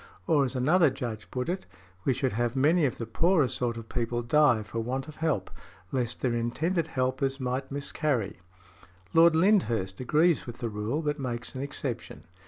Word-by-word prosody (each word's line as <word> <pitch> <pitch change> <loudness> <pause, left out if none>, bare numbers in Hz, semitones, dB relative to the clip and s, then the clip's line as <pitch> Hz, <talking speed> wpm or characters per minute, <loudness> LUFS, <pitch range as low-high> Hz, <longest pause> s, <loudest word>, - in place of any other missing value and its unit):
Or 155 -5 +3
as 130 - -3
another 155 +6 +4
Judge 120 -5 -5
put 125 -1 -3
it, 185 +2 -3 0.4
we 135 - +3
should 130 0 0
have 120 +2 0
many 155 +5 +4
of 130 - -1
the 115 - -4
poorer 160 +6 +3
sort 120 -1 -2
of 115 -1 -8
people 120 -1 -2
die 125 -3 +4
for 115 +2 -5
want 130 +4 -3
of 155 - -11
help, 155 - -1 0.4
lest 125 -2 -1
their 125 -2 +1
intended 160 +9 0
helpers 130 +1 -1
might 130 +1 -2
miscarry. 140 - -1 0.8
Lord 165 0 +6
Lyndhurst 120 - +2
agrees 155 +5 +2
with 120 0 -7
the 120 - -3
rule, 110 +9 -2
but 150 0 -1
makes 120 -3 -4
an 130 - -5
exception. 140 -3 -5
130 Hz, 180 wpm, -28 LUFS, 120-150 Hz, 0.8 s, Lord